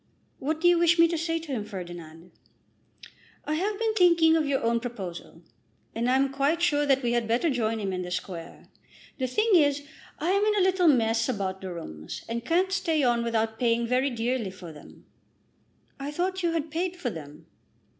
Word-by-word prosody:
"What 310 Hz, +3 st, -2 dB
do 350 Hz, -, +3 dB
you 350 Hz, -1 st, +5 dB
wish 340 Hz, 0 st, +4 dB
me 335 Hz, 0 st, +6 dB
to 335 Hz, -, -1 dB
say 330 Hz, +1 st, -1 dB
to 325 Hz, -3 st, -7 dB
him, 235 Hz, -6 st, -2 dB
Ferdinand?" 175 Hz, -4 st, -9 dB, 1.1 s
"I 305 Hz, -, -1 dB
have 395 Hz, +6 st, -1 dB
been 450 Hz, 0 st, 0 dB
thinking 340 Hz, -5 st, +5 dB
of 315 Hz, -2 st, +1 dB
your 275 Hz, -3 st, 0 dB
own 235 Hz, 0 st, +2 dB
proposal, 200 Hz, -8 st, -7 dB, 0.5 s
and 235 Hz, +2 st, -1 dB
I 255 Hz, -, +3 dB
am 270 Hz, 0 st, +1 dB
quite 280 Hz, +4 st, +1 dB
sure 295 Hz, -4 st, +2 dB
that 270 Hz, -1 st, +3 dB
we 240 Hz, -, +1 dB
had 240 Hz, -1 st, 0 dB
better 245 Hz, +8 st, +1 dB
join 225 Hz, -3 st, -1 dB
him 195 Hz, -2 st, -2 dB
in 180 Hz, -, -2 dB
the 180 Hz, -, -5 dB
Square. 180 Hz, -2 st, -6 dB, 0.5 s
The 260 Hz, -, 0 dB
thing 430 Hz, -, +1 dB
is, 290 Hz, -4 st, +4 dB, 0.3 s
I 325 Hz, +5 st, 0 dB
am 400 Hz, +1 st, +2 dB
in 425 Hz, 0 st, +2 dB
a 395 Hz, -, +3 dB
little 370 Hz, -2 st, +3 dB
mess 230 Hz, -4 st, +3 dB
about 190 Hz, -5 st, -2 dB
the 190 Hz, -1 st, -6 dB
rooms, 80 Hz, -, -8 dB
and 235 Hz, +1 st, -3 dB
can't 360 Hz, +8 st, +1 dB
stay 330 Hz, -6 st, +1 dB
on 240 Hz, -2 st, +2 dB
without 225 Hz, -1 st, -1 dB
paying 235 Hz, -1 st, +2 dB
very 255 Hz, +3 st, +1 dB
dearly 240 Hz, -2 st, -2 dB
for 185 Hz, -3 st, -10 dB
them." 150 Hz, -, -15 dB, 0.9 s
"I 275 Hz, +1 st, -4 dB
thought 370 Hz, +5 st, -2 dB
you 340 Hz, -2 st, 0 dB
had 320 Hz, -2 st, -2 dB
paid 350 Hz, +3 st, -2 dB
for 270 Hz, -9 st, -3 dB
them." 155 Hz, -2 st, -10 dB
260 Hz, 205 wpm, -27 LUFS, 220-330 Hz, 1.1 s, me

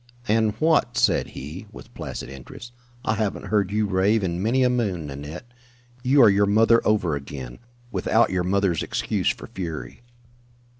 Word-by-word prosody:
"And 110 Hz, 0 st, +2 dB
what?" 155 Hz, -6 st, +2 dB
said -, -, +3 dB
he, 80 Hz, +10 st, -7 dB
with -, -, -13 dB
placid -, -, -6 dB
interest. 70 Hz, -, -11 dB, 0.3 s
"I -, -, +2 dB
haven't 105 Hz, -2 st, -2 dB
heard 100 Hz, -3 st, +2 dB
you 105 Hz, +1 st, +1 dB
rave 100 Hz, +2 st, +2 dB
in 85 Hz, -1 st, -2 dB
many 120 Hz, +5 st, +2 dB
a 125 Hz, -, +4 dB
moon, 100 Hz, -10 st, -1 dB
Nanette. 75 Hz, -, -7 dB, 0.6 s
You 135 Hz, +1 st, +5 dB
are 110 Hz, -, +8 dB
your 100 Hz, +1 st, +3 dB
mother 115 Hz, +3 st, +4 dB
over 95 Hz, -8 st, +1 dB
again 70 Hz, -3 st, -7 dB, 0.3 s
without 115 Hz, -1 st, +2 dB
your 90 Hz, -1 st, 0 dB
mother's 95 Hz, -3 st, +1 dB
excuse -, -, -1 dB
for -, -, -4 dB
fury." 85 Hz, 0 st, -6 dB
100 Hz, 160 wpm, -24 LUFS, 85-110 Hz, 0.6 s, are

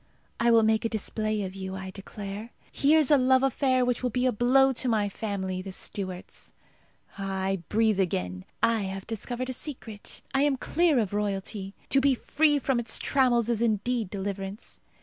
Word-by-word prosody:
I 235 Hz, -, +3 dB
will 230 Hz, -1 st, +6 dB
make 220 Hz, 0 st, +2 dB
a 230 Hz, -, 0 dB
display 215 Hz, -1 st, -2 dB
of 185 Hz, -1 st, -5 dB
you, 190 Hz, -1 st, -5 dB
I 190 Hz, 0 st, -6 dB
declare. 200 Hz, +2 st, -7 dB, 0.2 s
Here's 305 Hz, 0 st, +3 dB
a 290 Hz, -, +6 dB
love 260 Hz, +1 st, +4 dB
affair 260 Hz, -1 st, +2 dB
which 245 Hz, -1 st, 0 dB
will 250 Hz, -, 0 dB
be 250 Hz, +2 st, 0 dB
a 255 Hz, -, +4 dB
blow 260 Hz, +4 st, +4 dB
to 250 Hz, +1 st, 0 dB
my 215 Hz, -3 st, +2 dB
family, 190 Hz, -3 st, -3 dB
the 190 Hz, +1 st, -7 dB
Stuarts. 185 Hz, -1 st, -5 dB, 0.6 s
Ah! 195 Hz, -1 st, -2 dB
I 195 Hz, 0 st, 0 dB
breathe 220 Hz, -2 st, +2 dB
again. 90 Hz, -, -1 dB, 0.2 s
I 230 Hz, -1 st, +3 dB
have 190 Hz, 0 st, -5 dB
discovered 245 Hz, +3 st, -4 dB
a -, -, -4 dB
secret. 240 Hz, -6 st, -8 dB
I 270 Hz, -, +2 dB
am 285 Hz, -2 st, +2 dB
clear 330 Hz, +1 st, +2 dB
of 210 Hz, -5 st, 0 dB
royalty. 200 Hz, -1 st, -2 dB
To 270 Hz, -, +4 dB
be 275 Hz, -1 st, +4 dB
free 295 Hz, +4 st, +2 dB
from 270 Hz, -3 st, 0 dB
its 225 Hz, -2 st, -1 dB
trammels 245 Hz, -4 st, +2 dB
is 235 Hz, -2 st, 0 dB
indeed 225 Hz, -1 st, 0 dB
deliverance. 195 Hz, +1 st, -5 dB
220 Hz, 185 wpm, -27 LUFS, 195-255 Hz, 0.6 s, will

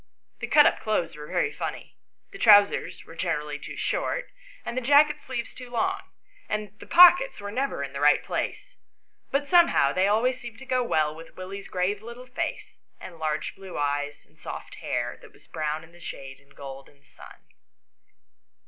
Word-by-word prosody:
The -, -, -4 dB
cut 295 Hz, -1 st, +6 dB
up -, -, +3 dB
clothes 195 Hz, -8 st, -1 dB
were 150 Hz, 0 st, -9 dB
very 430 Hz, -, 0 dB
funny; -, -, -6 dB, 0.4 s
the 395 Hz, -, -11 dB
trousers 205 Hz, -2 st, +5 dB
were -, -, -13 dB
generally 150 Hz, -3 st, -3 dB
too -, -, -9 dB
short, -, -, -2 dB, 0.3 s
and -, -, -4 dB
the 255 Hz, -, -1 dB
jacket 295 Hz, +3 st, +4 dB
sleeves 245 Hz, -3 st, -5 dB
too 250 Hz, -1 st, -10 dB
long, 380 Hz, +11 st, -1 dB, 0.5 s
and 210 Hz, -1 st, -3 dB
the -, -, -12 dB
pockets 360 Hz, +8 st, +7 dB
were 205 Hz, 0 st, -6 dB
never 255 Hz, -, -2 dB
in 140 Hz, 0 st, -6 dB
the 140 Hz, -, -5 dB
right 145 Hz, +1 st, +4 dB
place; -, -, -4 dB, 0.5 s
but 285 Hz, +1 st, 0 dB
some 345 Hz, 0 st, +6 dB
how 140 Hz, -, +2 dB
they 185 Hz, +1 st, +2 dB
always 240 Hz, +5 st, +2 dB
seemed 235 Hz, -2 st, -9 dB
to 265 Hz, -, -11 dB
go 255 Hz, -1 st, +1 dB
well 155 Hz, -9 st, +1 dB
with 165 Hz, +1 st, -13 dB
Willie's 195 Hz, +2 st, -7 dB
grave 190 Hz, +3 st, -1 dB
little 235 Hz, +3 st, -10 dB
face, 280 Hz, +7 st, -5 dB, 0.2 s
and 170 Hz, -3 st, -11 dB
large 155 Hz, -1 st, -2 dB
blue 190 Hz, -1 st, -9 dB
eyes, 145 Hz, 0 st, -2 dB
and -, -, -30 dB
soft -, -, -8 dB
hair, -, -, -3 dB
that -, -, -16 dB
was -, -, -22 dB
brown 155 Hz, 0 st, -3 dB
in 165 Hz, -, -16 dB
the 175 Hz, -, -18 dB
shade 135 Hz, -5 st, -8 dB
and 140 Hz, 0 st, -25 dB
gold 135 Hz, -1 st, -9 dB
in 145 Hz, -, -25 dB
the 140 Hz, -, -32 dB
sun. -, -, -15 dB
200 Hz, 195 wpm, -26 LUFS, -, 0.5 s, pockets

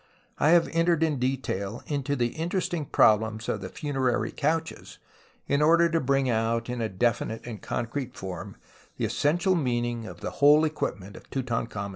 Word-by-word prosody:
I 150 Hz, +4 st, +5 dB
Jiave 170 Hz, -1 st, +4 dB
entered 165 Hz, -1 st, +2 dB
in 150 Hz, -4 st, 0 dB
detail 125 Hz, -5 st, -2 dB
into 145 Hz, -1 st, -2 dB
the 120 Hz, -3 st, +1 dB
interesting 170 Hz, +1 st, -2 dB
problems 110 Hz, -1 st, +3 dB
of -, -, -2 dB
the -, -, -6 dB
funerary 135 Hz, -6 st, -1 dB
couches 160 Hz, +2 st, -2 dB, 0.5 s
in 140 Hz, +1 st, +1 dB
order 170 Hz, +2 st, +5 dB
to 165 Hz, 0 st, +1 dB
bring 135 Hz, 0 st, +1 dB
out 115 Hz, 0 st, 0 dB
in 125 Hz, -1 st, -3 dB
a 110 Hz, -, -1 dB
definite 115 Hz, +2 st, -1 dB
and 115 Hz, -4 st, -7 dB
concrete 120 Hz, +2 st, -4 dB
form 95 Hz, -2 st, -6 dB, 0.4 s
tlie -, -, +1 dB
essential 175 Hz, +6 st, +1 dB
meaninof 120 Hz, -6 st, -1 dB
of 85 Hz, -1 st, -10 dB
the -, -, -4 dB
whole 150 Hz, +2 st, +5 dB
equipment 100 Hz, -10 st, -4 dB
of -, -, -14 dB
Tutankhamen's 120 Hz, -3 st, -2 dB
tomb. 100 Hz, -2 st, -5 dB
130 Hz, 170 wpm, -27 LUFS, 115-155 Hz, 0.5 s, I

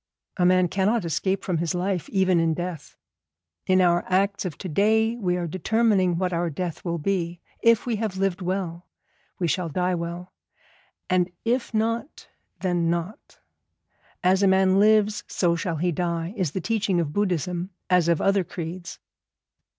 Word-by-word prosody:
A 180 Hz, -2 st, +4 dB
man 185 Hz, 0 st, +4 dB
cannot 200 Hz, +3 st, +1 dB
escape 190 Hz, +4 st, -1 dB
from 175 Hz, -4 st, -1 dB
his 170 Hz, 0 st, -1 dB
life 180 Hz, -1 st, -2 dB
even 190 Hz, -3 st, +2 dB
in 165 Hz, -1 st, +1 dB
death. 175 Hz, -2 st, -6 dB, 0.7 s
In 185 Hz, 0 st, +4 dB
our 175 Hz, -1 st, +3 dB
acts 200 Hz, +2 st, +1 dB
of 170 Hz, -5 st, -4 dB
to -, -, -6 dB
day 220 Hz, +7 st, +2 dB
we 180 Hz, -6 st, 0 dB
are 175 Hz, -, -2 dB
determining 185 Hz, +1 st, +1 dB
what 180 Hz, 0 st, -1 dB
our 170 Hz, 0 st, 0 dB
death 170 Hz, +2 st, -5 dB
will 170 Hz, -1 st, -2 dB
be; 175 Hz, 0 st, -2 dB, 0.2 s
if 230 Hz, -1 st, +4 dB
we 235 Hz, -3 st, -1 dB
have 210 Hz, -3 st, -3 dB
lived 195 Hz, -1 st, 0 dB
well, 180 Hz, -2 st, -3 dB, 0.5 s
we 175 Hz, -, 0 dB
shall 175 Hz, +1 st, -1 dB
die 180 Hz, +4 st, 0 dB
well; 175 Hz, +1 st, -5 dB, 0.7 s
and 180 Hz, -1 st, +2 dB, 0.2 s
if 240 Hz, +2 st, 0 dB
not, 230 Hz, +4 st, -2 dB, 0.3 s
then 175 Hz, -3 st, +1 dB
not. 170 Hz, +5 st, -4 dB, 0.9 s
As 185 Hz, +2 st, +3 dB
a 200 Hz, -, +4 dB
man 190 Hz, 0 st, +4 dB
lives 215 Hz, 0 st, +3 dB
so 170 Hz, -2 st, +1 dB
shall 170 Hz, 0 st, -2 dB
he 175 Hz, +3 st, 0 dB
die, 170 Hz, +1 st, -2 dB
is 180 Hz, -7 st, -1 dB
the 190 Hz, -, -2 dB
teaching 210 Hz, -3 st, 0 dB
of 155 Hz, -3 st, -2 dB
Buddhism 180 Hz, -2 st, -1 dB, 0.2 s
as 180 Hz, -2 st, +3 dB
of 170 Hz, -2 st, +2 dB
other 195 Hz, -1 st, +2 dB
creeds. 175 Hz, 0 st, -7 dB
185 Hz, 165 wpm, -25 LUFS, 170-195 Hz, 0.9 s, A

